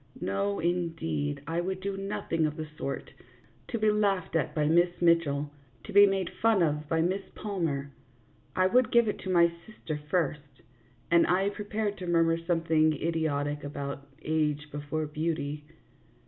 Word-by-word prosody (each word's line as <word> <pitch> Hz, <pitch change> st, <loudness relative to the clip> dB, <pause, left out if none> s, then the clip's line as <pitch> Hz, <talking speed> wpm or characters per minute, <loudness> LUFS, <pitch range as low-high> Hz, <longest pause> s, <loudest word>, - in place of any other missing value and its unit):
No, 100 Hz, +1 st, -1 dB
indeed, 160 Hz, -4 st, -1 dB
I 165 Hz, +1 st, -1 dB
would 185 Hz, +1 st, -3 dB
do 195 Hz, +1 st, -3 dB
nothing 195 Hz, -5 st, -1 dB
of 150 Hz, -, -5 dB
the 155 Hz, -1 st, -4 dB
sort, 140 Hz, -, -5 dB, 0.6 s
to 235 Hz, -, -2 dB
be 215 Hz, -1 st, +3 dB
laughed 200 Hz, -5 st, 0 dB
at 165 Hz, -1 st, 0 dB
by 150 Hz, -1 st, +2 dB
Miss 175 Hz, +2 st, +3 dB
Mitchell, 150 Hz, -4 st, +2 dB, 0.3 s
to 210 Hz, -, -9 dB
be 205 Hz, 0 st, +9 dB
made 195 Hz, -2 st, -1 dB
fun 220 Hz, -5 st, +4 dB
of 150 Hz, -1 st, -1 dB
by 165 Hz, -1 st, +2 dB
Miss 185 Hz, +4 st, 0 dB
Palmer. 165 Hz, -9 st, -2 dB, 0.6 s
I 185 Hz, -, +3 dB
would 245 Hz, +5 st, +3 dB
give 235 Hz, -1 st, +5 dB
it 210 Hz, -, -2 dB
to 190 Hz, -, -6 dB
my 170 Hz, -2 st, +5 dB, 0.2 s
sister 160 Hz, -8 st, -6 dB
first, 150 Hz, -5 st, -2 dB, 0.5 s
and 170 Hz, 0 st, +5 dB
I 190 Hz, +2 st, +2 dB
prepared 210 Hz, 0 st, -3 dB
to 180 Hz, -, -5 dB
murmur 165 Hz, -1 st, +3 dB
something 165 Hz, -2 st, +2 dB
idiotic 150 Hz, -2 st, -1 dB
about 140 Hz, -1 st, -5 dB
" -, -, -28 dB
age 150 Hz, -1 st, 0 dB
before 145 Hz, +2 st, -3 dB
beauty." 150 Hz, -1 st, -3 dB
165 Hz, 160 wpm, -29 LUFS, 150-185 Hz, 0.6 s, be